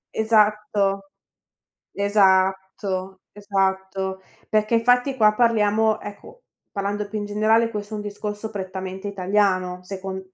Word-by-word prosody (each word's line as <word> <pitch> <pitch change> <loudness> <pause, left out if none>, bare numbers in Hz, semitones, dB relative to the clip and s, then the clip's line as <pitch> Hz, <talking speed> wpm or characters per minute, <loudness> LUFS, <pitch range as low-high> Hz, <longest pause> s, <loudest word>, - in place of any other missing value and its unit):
Esatto. 210 -2 +2 0.9
Esatto, 190 -1 +1
esatto. 190 -1 -2 0.3
Perché 215 +1 +1
infatti 245 +3 +3
qua 215 -2 +4
parliamo, 220 -2 +2
ecco, 450 - -11 0.3
parlando 205 +1 -2
più 215 +1 -4
in 205 - -4
generale, 220 +2 +2
questo 210 0 -6
è - - -2
un 210 - -5
discorso 210 +1 -5
prettamente 190 0 -6
italiano, 185 -2 0
secon 190 0 -6
205 Hz, 110 wpm, -23 LUFS, 190-215 Hz, 0.9 s, qua